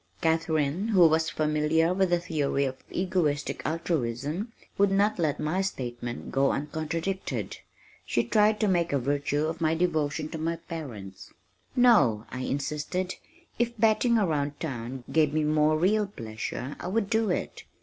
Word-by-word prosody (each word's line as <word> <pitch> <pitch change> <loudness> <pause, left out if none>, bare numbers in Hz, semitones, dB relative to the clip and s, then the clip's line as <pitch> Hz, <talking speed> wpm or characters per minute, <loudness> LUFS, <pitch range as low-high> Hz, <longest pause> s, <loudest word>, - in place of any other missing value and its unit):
Katharine 160 +2 +1
who 185 -7 +6
was 160 0 +2
familiar 155 +2 +1
with 190 0 +2
the 175 0 +3
theory 150 -5 0
of 130 -1 -5
Egoistic 175 -6 0
Altruism 155 - -2 0.2
would 200 0 +4
not 200 +1 +2
let 155 -3 0
my 155 +5 0
statement 120 -9 -4
go 135 0 +3
uncontradicted. 160 +6 -3 0.5
She - - 0
tried 215 0 +3
to 215 - +3
make 175 -3 +1
a 140 - +2
virtue 145 +3 0
of 160 +1 -4
my 160 0 +2
devotion 155 -3 0
to 160 - -6
my 165 +1 -1
parents. 120 - -8 0.4
"No," 145 - +5
I 125 - -5
insisted, 150 +7 -2 0.5
"if 235 0 0
batting 225 +2 +3
around 150 -8 0
town 130 -4 -5
gave 155 -2 +3
me 155 - +2
more 155 0 +3
real 205 +5 +2
pleasure 120 - -5
I - - -5
would 200 +2 0
do 225 0 +1
it. 180 - -2
160 Hz, 150 wpm, -27 LUFS, 145-185 Hz, 0.5 s, who